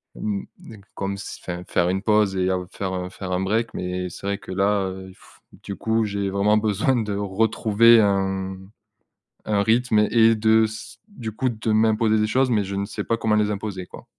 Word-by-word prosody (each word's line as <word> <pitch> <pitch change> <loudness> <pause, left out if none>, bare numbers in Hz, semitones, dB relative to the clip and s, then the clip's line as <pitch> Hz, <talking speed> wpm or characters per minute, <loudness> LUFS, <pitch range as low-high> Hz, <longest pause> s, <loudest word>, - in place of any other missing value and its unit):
Hem, 100 -2 -4 0.2
hem, 110 -3 -12
comme 100 0 -3
si, 100 - -8
enfin, 90 0 -5
faire 85 - +1
une 95 +1 -1
pause 105 -2 +2
et 95 0 +1
à 95 - +1
faire 95 -2 -4
faire 95 -2 -6
un 90 - 0
break, 110 +4 -1
mais 90 0 -3
c'est 90 - -11
vrai 100 0 -1
que - - -10
là, 100 +1 +1
heu, 95 0 -9 0.5
du 100 - -6
coup, 110 +1 0
j'ai 100 -1 -2
vraiment 100 +2 +2
besoin 110 +4 +1
de 110 -4 -1
retrouver 110 +3 +3
un 95 -2 0 0.9
un 100 -1 +1
rythme 115 0 +2
et 115 -1 +5
de 110 +1 +4
s 110 +1 -8
du 125 - -7
coup 130 +4 -1
de 110 -1 -3
m'imposer 110 0 +3
des 105 - +1
choses, 130 +3 +1
mais 105 -3 +2
je 100 0 -5
ne 100 0 -1
sais 105 - -5
pas 115 - -1
comment 110 -1 0
les 105 -1 +2
imposer, 100 -3 -5
quoi. - - -12
105 Hz, 205 wpm, -23 LUFS, 95-110 Hz, 0.9 s, et